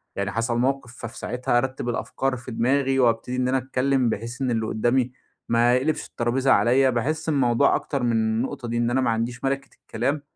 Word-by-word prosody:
يعني 100 0 -2
حصل 115 +2 -1
موقف، 125 -1 -1
ففي 115 - -8
ساعتها 125 0 -1
أرتِّب 130 0 -2
الأفكار 130 +2 -2
في 120 +1 -9
دماغي 135 +3 +1
وأبتدي 120 0 +1
إن 125 0 0
أنا 130 +1 +2
أتكلّم 130 0 +1
بحيث 115 +4 -5
إن 130 -2 0
اللي 110 -1 0
قدّامي 120 +3 +1 0.4
ما 120 +1 +4
يقلبش 140 +5 0
الطرابيزة 130 +3 0
عليّا. 130 +3 +4
باحس 155 +7 -1
الموضوع 135 -2 +3
أكتر 140 -3 -2
من 120 - +2
النُقطة 115 +3 -1
دي. 120 0 -2
إن 120 0 +1
أنا 130 +2 +1
ما 125 - +1
عنديش 115 +2 -2
مَلِكِة 135 +1 -1
الكلام. 140 +6 -2
125 Hz, 190 wpm, -24 LUFS, 120-135 Hz, 0.4 s, ما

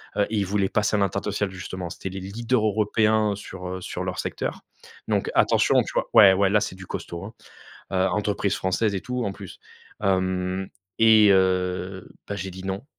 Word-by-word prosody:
Heu, 100 - +2
ils 105 -3 0
voulaient 100 0 0
passer 105 0 +1
à - - +2
l'international 100 0 -1
justement. 95 -1 -6
C'étaient 95 - -6
les 95 +1 -6
leaders 115 +4 -1
européens 105 0 +2
sur, 95 -2 -8
heu, 95 0 -5
sur 90 +1 -5
leur 90 -1 -4
secteur. - - -4 0.5
Donc - - 0
attention, - - +4
tu - - -7
vois? - - 0
Ouais, 95 -3 +9
ouais, 95 0 +2
là, 105 0 +3
c'est 100 -3 -3
du 95 0 -11
costaud, 85 +1 -6
hein, 110 - -9 0.6
heu 95 0 +2
entreprise 100 0 0
française 100 +3 0
et 95 - -2
tout, 125 0 -3
en 100 - -2
plus. 95 -2 -11 0.4
Mmh, 95 -1 0 0.3
et 110 -2 +7
heu, 95 0 0 0.2
bah, 100 - -3
j'ai 95 0 -5
dit 95 +1 -10
non. 95 +5 -4
95 Hz, 190 wpm, -24 LUFS, 95-105 Hz, 0.6 s, Ouais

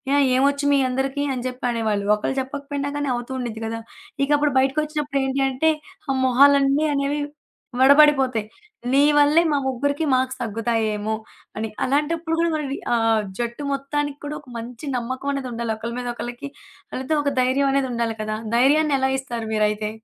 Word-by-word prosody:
ఆహ్, 285 -1 +4
ఏమొచ్చు, 280 +2 +2
మీ 280 - +4
అందరికి" 270 +2 -1
అని 245 - -4
చెప్పి 250 0 -8
అనేవాళ్ళు. 215 -3 -1
ఒకళ్లు 240 +5 -3
చెప్పకపోయినా 280 +1 -4
గానీ 290 -1 -2
అవుతూ 240 +2 -6
ఉండిద్ది 230 -3 -5
కదా! 225 +1 -3 0.5
ఇకప్పుడు 295 +1 +2
బయటికొచ్చినప్పుడు 295 +1 0
ఏంటి 265 +1 -1
అంటే, 270 +5 +1 0.4
ఆ - - +2
మొహాలన్ని 280 +3 +5
అనేవి 280 +1 0 0.6
వడబడిపోతాయి. 270 -5 +5 0.5
నీ 275 +1 +5 0.2
వల్లే 295 +3 +5
మా 285 - +2
ముగ్గురికి 285 +4 -1
మార్క్స్ 260 0 0
తగ్గుతాయి 225 0 -1
ఏమో 215 +1 -2 0.4
అని. 220 0 -2 0.2
అలాంటప్పుడు 320 +4 0
కూడా 335 0 +2
మనవి 285 -3 -3 0.2
ఆహ్, 225 -2 +2 0.2
జట్టు 235 +4 -3
మొత్తానికి 285 +1 -2
కూడా 300 +1 -4
ఒక 280 - -26
మంచి 235 +4 -8
నమ్మకమనేదుండాలి. 255 -2 -3
ఒకళ్ళ 230 +1 -5
మీద 245 - -5
ఒకళ్ళకి, 240 +4 -6 0.4
ఆళ్ళతో 265 +4 -2
ఒక 285 - +1
ధైర్యమనేదుండాలి 260 -3 +1
కదా! 215 0 -3 0.2
ధైర్యాన్ని 290 +3 +4
ఎలా 265 0 +1
ఇస్తారు 235 -4 -5
మీరైతే? 210 0 0
265 Hz, 150 wpm, -22 LUFS, 235-285 Hz, 0.6 s, మొహాలన్ని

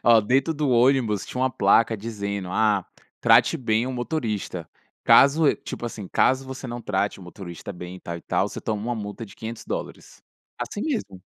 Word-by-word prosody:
ó, 115 -1 +7
dentro 135 +9 +1
do 145 -2 0
ônibus 120 -4 +3
tinha 125 - -5
uma 130 - +2
placa 115 +1 +3
dizendo 100 -3 -4
“ah, 105 -1 +2 0.3
trate - - +5
bem 115 0 0
o 130 - -3
motorista”. 110 - -3 0.3
Caso 145 +2 +6
e - - +2
tipo - - -7
assim, 110 -4 -5
caso 130 +6 +2
você 130 0 -7
não 120 0 -5
trate 100 -2 -1
o - - -12
motorista 90 +1 -8
bem 90 +1 -8
e - - -13
tal, 85 0 -5
e - - -9
tal, - - 0
você - - -7
toma 105 -2 -2
uma 120 +1 -2
multa 105 +1 -6
de - - -15
$500. 115 0 -7 0.4
Assim 205 - -4
mesmo. 210 - -3
110 Hz, 190 wpm, -24 LUFS, 100-130 Hz, 0.4 s, ó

